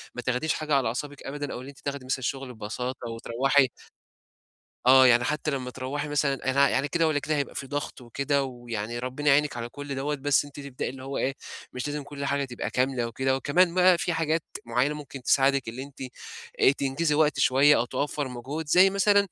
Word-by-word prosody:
ما 125 - -4
تاخديش 130 +5 0
حاجة 155 -2 -1
على 135 -4 +2
أعصابِك 145 +4 -5
أبدًا 145 0 -5
أو 125 - -6
إن 130 - -10
أنتِ 140 - -12
تاخدي 140 -2 -5
مثلًا 130 0 -1
الشُغل 130 0 -4
ببساطة 120 +3 -5
وتروّحي 130 +4 +2 1.2
آه. 130 0 +8
يعني 120 0 +5
حتّى 150 0 -1
لمّا 130 -2 -3
تروّحي 140 +4 -4
مثلًا 140 -2 0
أنا 140 +1 +4
يعني 140 - +1
كده 165 0 +1
والّا 150 -2 +1
كده 155 +2 -1
هيبقى 140 -1 -2
فيه 135 - -4
ضغط 145 -2 -4
وكده 140 +3 0
ويعني 120 -3 -5
ربِّنا 130 +4 -4
يعينِك 145 -1 +3
على 120 0 -4
كل 145 +1 -6
دوّة، 145 +2 -1
بس 145 +1 +2
أنتِ 145 - -14
تبدئي 140 -2 -4
اللي 130 0 -9
هو 135 +1 -4
إيه، 135 +1 -1 0.4
مش 125 +3 -3
لازم 145 0 -3
كل 140 0 -6
حاجة 140 0 0
تبقى 120 -4 -5
كاملة 125 -1 0
وكده. 130 +3 0
وكمان 170 +6 +2
بقى 180 -1 +6
في 175 0 -1
حاجات 160 0 0 0.2
معيّنة 125 +6 +1
ممكن 140 -2 -9
تساعدِك 135 -1 +3
اللي 130 +4 -6
أنتِ 140 -1 -13 0.6
آآ - - +6
تنجزي 145 +3 0
وقت 155 -1 +2
شوية 140 +3 +5
أو 120 - +1
توفَّر 145 +2 -2
مجهود 135 +6 -6
زي 180 +5 +6
مثلًا 200 +1 +3
140 Hz, 205 wpm, -27 LUFS, 130-145 Hz, 1.2 s, آه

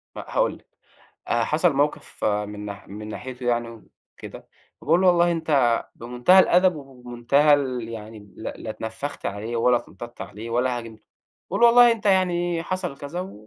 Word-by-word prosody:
ما - - -7
هاقول - - 0
لِك - - -27 0.6
حصل 150 +8 +1
موقف 145 +2 -2
من 105 0 -2 0.2
من 105 +2 -8
ناحيته 125 +3 -7
يعني 120 -1 0 0.5
وكده - - -10 0.3
فباقول 165 +4 +2
له 190 - +4
والله 175 -1 +4
أنت 145 -8 +1
بمنتهى 125 +10 +3
الأدب 185 -1 +4
وبمنتهى 135 +1 +1
ال 130 -5 -1
يعني 110 -1 -8 0.2
ل - - -11
لا 110 - -6
اتنفخت 110 +6 -6
عليه 105 +4 -4
ولا 120 +1 +3
اتنطّطت 120 -1 -10
عليه 105 +4 -8
ولا 125 +1 0
هاجمته 110 -2 -12 0.5
باقول - - +1
والله 240 0 +7
أنت 225 -3 -4
يعني 175 -3 +1
حصل 180 -6 -4
كذا 175 +7 -6
130 Hz, 150 wpm, -23 LUFS, 115-175 Hz, 0.6 s, والله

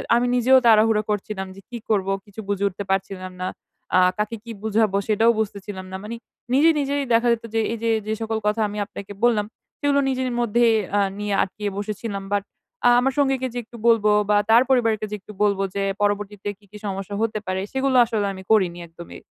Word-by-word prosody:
আমি 240 +1 +2
নিজেও 255 +2 +5
তাড়াহুড়ো 220 -1 +5
করছিলাম 205 -2 -3
যে 195 - -12
কি 245 - -6
করব? 195 -3 +1 0.2
কিছু 205 0 -13
বুঝে 200 0 -1
উঠতে 200 +1 -5
পারছিলাম 190 -1 -2
না। 185 - -1 0.5
আ - - +7 0.2
কাকে 210 +2 -2
কি 230 - -8
বুঝাবো 215 -2 +2
সেটাও 220 +2 +4
বুঝতেছিলাম 200 -2 -4
না, 190 - -5
মানে 220 +2 -5 0.4
নিজে, 295 +5 +5
নিজেই 285 0 0
দেখা 230 +1 +3
যেত 230 - -5
যে 225 - +1
এই - - -3
যে, 230 - +1 0.2
যে 220 - 0
সকল 225 0 -1
কথা 215 +1 +1
আমি 205 +1 -7
আপনাকে 200 0 -9
বললাম, 220 -4 +3 0.3
সেগুলো 285 -1 +2
নিজের 260 -1 -1
মধ্যে 240 0 +2 0.3
আ - - +4 0.2
নিয়ে 210 -1 -2
আটকিয়ে 205 +2 -4
বসেছিলাম। 205 -1 -4
বাট, 205 -1 +1 0.4
আ - - +8
আমার 270 +2 +1
সঙ্গীকে 270 -2 +1
যে 245 - -5
একটু 235 +1 -13
বলব 225 -2 +4 0.2
বা 210 - +5
তার 230 +2 +7
পরিবারকে 225 -4 +2
যে - - -2
একটু 195 - -13
বলব 200 -2 +2 0.2
যে 200 - 0 0.2
পরবর্তীতে 205 0 -1
কি, 210 - -25
কি 210 - -10
সমস্যা 195 0 -4
হতে 220 -1 0
পারে? 185 0 -1
সেগুলো 265 0 +1
আসলে 220 -3 -1
আমি 190 - -10
করিনি 185 -5 +3
একদমই। 170 +1 -11
215 Hz, 200 wpm, -23 LUFS, 200-235 Hz, 0.5 s, আ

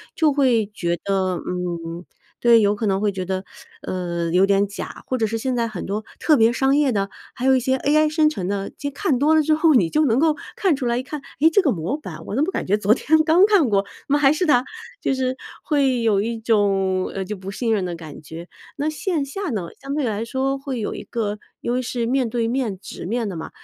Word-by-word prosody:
就 310 -3 +3
会 255 -6 +3
觉 175 -4 -1
得， 190 -2 0
嗯 175 -1 -4 0.4
对， 235 -1 +6
有 205 0 +3
可 220 - -3
能 195 -1 +1
会 210 -1 +2
觉 190 -1 -4
得， 190 0 -2 0.4
呃， 170 -2 -3
有 185 +3 +5
点 200 0 +2
假。 200 - -8
或 255 - -1
者 225 - +1
是 225 +1 -2
现 255 +2 -1
在 235 -1 0
很 215 -6 -6
多 210 +3 -3
特 305 -3 +4
别 225 +1 +4
商 265 +2 +2
业 290 -3 +3
的， 200 -3 -1 0.2
还 250 - -5
有 265 - +6
一 - - +3
些 260 +2 +1
AI 305 +3 +3
生 305 -1 +4
成 190 -12 -4
的， 200 0 -2
其 285 - -4
实 - - -12
看 300 -3 0
多 295 +5 +3
了 315 - +5
之 310 +1 +2
后， 315 0 +4
你 190 -11 +4
就 305 - +2
能 240 -2 +2
够 315 0 +3 0.2
看 375 -6 +2
出 265 -2 -4
来 240 0 +1
一 - - -2
看， 295 +3 -6 0.2
哎， 320 - +7
这 390 +3 +4
个 290 - +3
模 180 - -2
板 165 - -9
我 - - -4
怎 275 - +2
么 360 - -1
感 - - -3
觉 205 +3 +3
昨 210 0 +3
天 315 +5 +3
刚 325 +4 +5
看 400 -10 +4
过？ 200 -2 +3
怎 200 +7 -7
么 290 - +4
还 275 -2 +5
是 310 +4 0
它， 250 -6 +4 0.4
就 270 - 0
是 260 0 -1 0.3
会 270 -5 +1
有 210 -3 +3
一 230 +2 -2
种， 195 -4 +1
呃， 195 -1 -4
就 210 +3 -4
不 190 0 -8
信 225 +3 -1
任 205 -3 0
的 175 -1 -4
感 160 -3 -10
觉。 160 +3 -9 0.3
那 290 +1 -2
线 310 -1 -1
下 385 +7 -4
呢， 195 -9 -3
相 275 +1 -4
对 300 - 0
来 215 -1 -2
说 265 +3 -1
会 270 -3 -4
有 210 - -3
一 - - -6
个 210 -3 -3 0.2
因 240 - -1
为 250 - 0
是 240 -1 -2
面 250 0 +1
对 230 0 -1
面 235 -5 -1
直 180 - -8
面 230 +2 -1
的 195 - -5
嘛， 160 - -6
230 Hz, 275 characters per minute, -22 LUFS, 195-280 Hz, 0.4 s, 哎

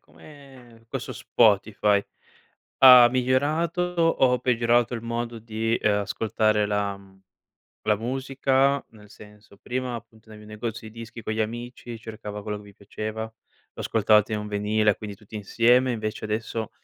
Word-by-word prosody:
come, 130 -6 -17
questo - - -5
Spotify, 105 -2 +2 0.8
ha 125 -2 +10
migliorato 145 +7 +1
o 165 -8 +2
peggiorato 120 -1 +2
il 115 - -5
modo 115 0 -4
di, 115 +1 -2
ehm, 105 -1 +1
ascoltare 105 +1 0
la 105 -1 -1
mhmm, 95 -1 -19 0.6
la 105 - +2
musica; 135 +3 0
nel 105 -2 -17
senso, 105 -1 -16
prima 125 +1 -4
appunto 110 -1 -11
andavi 105 -1 -12
negozi 110 +1 -6
di 115 +2 -11
dischi 115 0 -9
con 110 - -3
gli 110 - -2
amici, 120 +1 -7
cercava 110 -2 -8
quello 105 0 -4
che 105 - -10
vi 100 0 -15
piaceva, 110 +2 -6
lo 110 - -10 0.5
ascoltavate 110 -1 +3
in 105 - 0
un 105 0 -6
vinile 105 0 +1
quindi 105 -2 -7
tutti 105 +1 -18
insieme 120 +5 +3
invece 110 -1 -4
adesso, 110 +1 -3
110 Hz, 150 wpm, -25 LUFS, 105-120 Hz, 0.8 s, ha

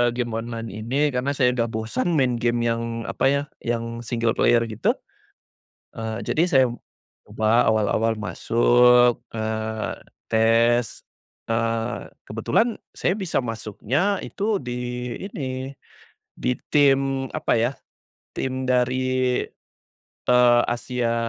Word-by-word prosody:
game 120 -1 -1
online 115 0 -5
ini 125 +8 0
karena 130 +2 -1
saya 125 -3 +3
udah 115 -2 +1
bosan 115 +9 -2
main 130 -4 +2
game 120 0 +1
yang 115 0 -2
apa - - -1
ya, 140 +1 +2 0.2
yang 115 0 -3
single 115 0 0
player 120 -1 +4
gitu, 110 0 +1 1.0
eee, 110 0 -4
jadi 160 - +2
saya 130 -2 +5 0.6
ubah 110 +2 +2
awal-awal 110 +1 +1
masuk, 120 +3 +4 0.2
eee, 110 0 -2 0.4
tes, 115 +1 +3 0.5
eee, 115 0 -1 0.2
kebetulan 235 +1 +1 0.2
saya 180 - +1
bisa 190 -4 -1
masuknya 125 - -1
itu 210 +2 -1
di 125 0 -4 0.2
ini, 130 -3 -5 0.6
di 125 - 0 0.2
tim 135 -2 +3
apa - - +1
ya, 120 +3 +1 0.6
tim 130 0 -3
dari, 125 0 +2 1.3
eee, 125 -1 +6
Asia, 120 0 -1
120 Hz, 115 wpm, -23 LUFS, 115-130 Hz, 1.3 s, eee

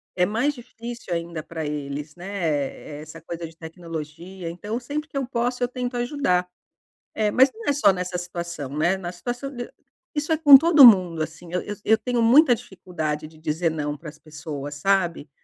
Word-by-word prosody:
É 180 - +3
mais 235 +9 0
difícil 235 -4 -8
ainda 170 -1 -3
pra 160 -1 -5
eles, 150 +1 -5
né, 175 - -10
eh 150 -6 -3
eh, - - -8
essa 155 +1 -11
coisa 165 0 -6
de 160 - -16
tecnologia, 165 +1 -8
então 205 +7 -4
sempre 290 +4 -4
que 285 - -7
eu 270 - 0
posso 245 0 -1
eu - - +2
tento 250 0 -4
ajudar. 240 -8 0 0.7
Eh, 210 -1 +1
mas 260 +2 +5
não 450 0 -10
é 285 - +4
só 265 -8 +5
nessa 180 -1 -3
situação, 170 -5 -5
né, 170 +5 +2
na 175 -2 -5
situação 245 +9 -5
de 245 0 -6 0.5
isso 295 +2 -2
é 315 - +1
com 290 -3 +10
todo 310 -2 +7
mundo, 180 -8 +6
assim, 165 +2 -6
eu 180 - 0
eu 205 - -6
eu 220 - +5
tenho 245 0 -1
muita 250 +3 +6
dificuldade 160 -7 -5
de 155 0 -18
dizer 160 +2 -1
não 150 -2 -3
para 150 +1 -9
as - - -14
pessoas, 150 -2 -7
sabe? 175 -2 0
180 Hz, 200 wpm, -24 LUFS, 160-240 Hz, 0.7 s, com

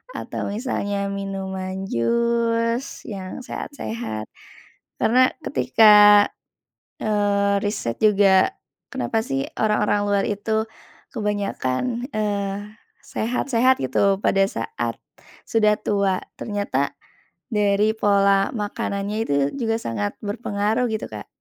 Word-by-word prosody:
atau - - -5
misalnya 210 -3 -2 0.2
minuman 190 -1 -4 0.2
jus 235 - 0
yang 195 +6 -6
sehat-sehat. 230 - -5 0.7
Karena 245 +3 +3 0.2
ketika, 130 - +4 1.1
eee, 200 -1 +1
riset 205 - -2
juga, 200 - +5 0.4
kenapa 225 - -2
sih, 270 0 -1 0.2
orang-orang 210 -1 +2
luar 200 -1 +1
itu 220 +2 -1 0.4
kebanyakan, 210 - -2
eee, 205 0 -3 0.2
sehat-sehat 250 +2 +1
gitu 195 +10 +1
pada 195 -1 +3
saat 445 - -3 0.5
sudah 215 -2 +4
tua? 200 -3 +1 0.2
Ternyata 200 - -2 0.6
dari 210 0 +2
pola 200 -1 +3
makanannya 205 -1 -3
itu 140 - -1 0.2
juga 225 -3 0
sangat 105 -3 -2
berpengaruh 210 +2 -1
gitu, 220 - -3
Kak. - - -7
205 Hz, 95 wpm, -22 LUFS, 195-225 Hz, 1.1 s, juga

